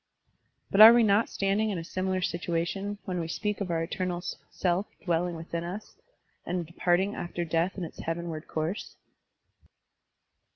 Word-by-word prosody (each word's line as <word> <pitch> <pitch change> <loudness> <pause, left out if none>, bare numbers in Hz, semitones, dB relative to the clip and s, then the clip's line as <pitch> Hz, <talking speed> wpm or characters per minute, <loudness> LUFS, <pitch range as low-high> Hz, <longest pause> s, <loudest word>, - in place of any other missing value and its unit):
But 200 - +5
are 225 +2 +13
we 240 0 +5
not 210 +1 +3
standing 200 +3 +1
in 200 - -2
a 165 - -4
similar 185 +2 -2
situation 175 +3 -2
when 180 -2 -2
we 165 - -2
speak 210 +5 -2
of 195 - -2
our 165 -1 0
eternal 180 +1 -3 0.3
self 180 +2 0 0.2
dwelling 175 0 0
within 165 +1 -4
us 185 +5 -7 0.5
and 175 -1 -2
departing 180 +4 +1
after 175 -2 -4
death 165 +4 0
in 185 - -3
its 165 - -8
heavenward 165 -1 -4
course? 160 +6 -3
180 Hz, 155 wpm, -28 LUFS, 170-195 Hz, 0.5 s, are